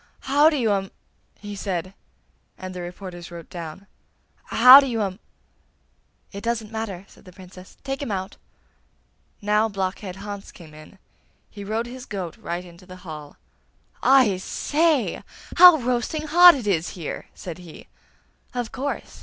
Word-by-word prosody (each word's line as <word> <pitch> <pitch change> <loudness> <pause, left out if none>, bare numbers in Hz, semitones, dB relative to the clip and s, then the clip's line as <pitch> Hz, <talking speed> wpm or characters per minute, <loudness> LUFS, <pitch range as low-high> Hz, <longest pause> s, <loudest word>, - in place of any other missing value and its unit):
'How 290 +3 +4
do 305 - -1
you 230 -5 +1
um!' 195 -1 -1 0.5
he 205 0 -8
said, 185 -2 -4 0.6
and 185 -1 -8
the 180 - -6
reporters 175 -1 -8
wrote 170 -2 -11
down. 170 +2 -8 0.6
'How 255 +2 +9
do 275 - 0
you 235 -3 -2
um.' 190 0 -4 1.1
'It 200 - -8
doesn't 230 -2 -2
matter!' 210 -4 -5
said - - -20
the 185 - -14
Princess. 185 0 -14
'Take 270 0 -4
him 280 - -4
out!' 190 -2 -4 1.1
Now 210 +2 +2
Blockhead 190 -1 -4
Hans 200 0 -8
came 160 -4 -15
in; 155 +6 -15 0.5
he 205 - -9
rode 220 +3 -2
his 250 +1 -10
goat 185 -5 -5
right 175 +1 -5
into 175 +1 -16
the 185 0 -13
hall. 150 -3 -9 0.6
'I 255 -8 +4
say! 300 - 0 0.3
How 355 -1 +10
roasting 255 +4 -2
hot 350 +3 +8
it 255 -6 -6
is 180 -3 -1
here!' 165 -4 -6
said 175 -2 -8
he. 170 -3 -13 0.7
'Of 245 -2 -3
course! 275 +2 -5
200 Hz, 155 wpm, -23 LUFS, 180-245 Hz, 1.1 s, How